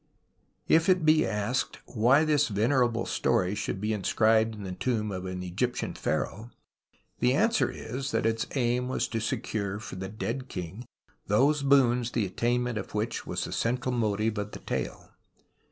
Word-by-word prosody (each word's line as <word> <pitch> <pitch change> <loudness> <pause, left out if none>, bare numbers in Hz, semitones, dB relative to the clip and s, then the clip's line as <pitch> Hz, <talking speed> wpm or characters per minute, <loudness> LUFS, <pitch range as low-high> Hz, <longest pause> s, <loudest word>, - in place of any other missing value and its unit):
If 165 +3 +4
it 180 -3 +3
be 155 0 +5
asked 105 +4 -1
why 130 +7 +3
this 150 -2 +3
venerable 115 +2 +1
story 95 +1 +1
should 105 -2 -3
be 105 +2 -1
inscribed 110 +2 +2
in 105 - -8
the 95 - -5
tomb 105 +1 -1
of 95 -1 -4
an 90 0 -4
Egyp 100 +8 -1
tian - - -3
pliaraoh, 110 +4 -2 0.7
the 125 +1 +3
answer 225 - +2
is 130 +4 -5
that - - 0
its 115 0 0
aim 125 -1 +1
was 130 - -1
to 115 - -2
secure 105 -2 -2
for 110 -3 -8
the 95 +1 -5
dead 115 +5 -4
king 95 +6 -6 0.4
those 140 +8 +3
boons 125 -4 +4
the 115 -4 +1
attainment 120 +3 0
of 100 - -8
which 110 +2 -2
was - - -2
the - - -5
central 125 +2 -1
motive 110 -2 0
of 105 0 -5
the - - -7
tale. - - -4
115 Hz, 170 wpm, -28 LUFS, 105-130 Hz, 0.7 s, be